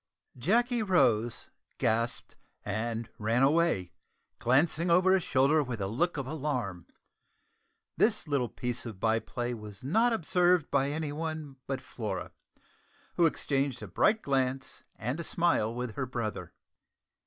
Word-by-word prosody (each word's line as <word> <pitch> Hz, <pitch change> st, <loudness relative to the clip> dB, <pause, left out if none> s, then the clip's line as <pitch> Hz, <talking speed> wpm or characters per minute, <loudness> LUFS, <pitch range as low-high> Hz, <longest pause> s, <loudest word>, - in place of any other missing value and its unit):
Jacky 235 Hz, -, +2 dB
rose, 120 Hz, -, +2 dB, 0.3 s
gasped, 115 Hz, +2 st, -1 dB, 0.3 s
and 115 Hz, +2 st, -2 dB
ran 115 Hz, +4 st, +2 dB
away, 140 Hz, -, +2 dB, 0.5 s
glancing 155 Hz, +7 st, +2 dB
over 185 Hz, +2 st, +5 dB
his 190 Hz, -, +3 dB
shoulder 145 Hz, +1 st, +3 dB
with 125 Hz, -5 st, -4 dB
a 95 Hz, -, -1 dB
look 155 Hz, -, 0 dB
of 135 Hz, -, -2 dB
alarm. 130 Hz, -, -3 dB, 1.1 s
This 215 Hz, -5 st, +2 dB
little 140 Hz, -5 st, 0 dB
piece 120 Hz, +2 st, -3 dB
of 105 Hz, -5 st, -8 dB
by 110 Hz, +1 st, +2 dB
play 120 Hz, +2 st, -4 dB
was 105 Hz, -2 st, -9 dB
not 225 Hz, -, +3 dB
observed 180 Hz, -4 st, +2 dB
by 140 Hz, 0 st, +2 dB
any 150 Hz, 0 st, -2 dB
one 155 Hz, -2 st, -5 dB
but 135 Hz, -1 st, -2 dB
Flora, 105 Hz, -8 st, -5 dB, 0.8 s
who 170 Hz, -, +4 dB
exchanged 140 Hz, -4 st, -1 dB
a -, -, -6 dB
bright 220 Hz, +1 st, +2 dB
glance 130 Hz, -1 st, -1 dB
and 125 Hz, +8 st, -3 dB
a -, -, -3 dB
smile 165 Hz, -10 st, +1 dB
with 125 Hz, -1 st, -4 dB
her 130 Hz, +1 st, -3 dB
brother. 115 Hz, -3 st, -4 dB
135 Hz, 140 wpm, -30 LUFS, 115-165 Hz, 1.1 s, over